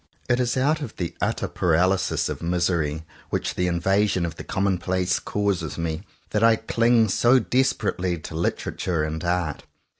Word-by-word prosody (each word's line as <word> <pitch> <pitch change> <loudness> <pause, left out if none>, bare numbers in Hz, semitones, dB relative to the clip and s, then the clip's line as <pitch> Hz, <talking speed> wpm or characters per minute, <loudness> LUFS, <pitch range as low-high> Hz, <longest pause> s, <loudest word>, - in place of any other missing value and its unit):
It 120 +1 +2
is 125 0 0
out 150 +4 +2
of 125 - -6
the 85 -2 -3
utter - - 0
paralysis 90 +2 +1
of - - -5
misery 85 -3 0 0.2
which - - -1
the 90 - 0
invasion 95 +2 +1
of 85 -1 -5
the - - -8
commonplace 95 -2 0
causes 100 -6 -2
me, 80 -1 -2 0.3
that 105 0 +1
I 115 0 +6
cling 115 0 +2
so 120 +6 +4
desperately 110 -8 0
to 80 - -9
Literature 85 0 -1
and 80 +1 -3
Art. 85 -4 -1
90 Hz, 155 wpm, -24 LUFS, 85-110 Hz, 0.3 s, I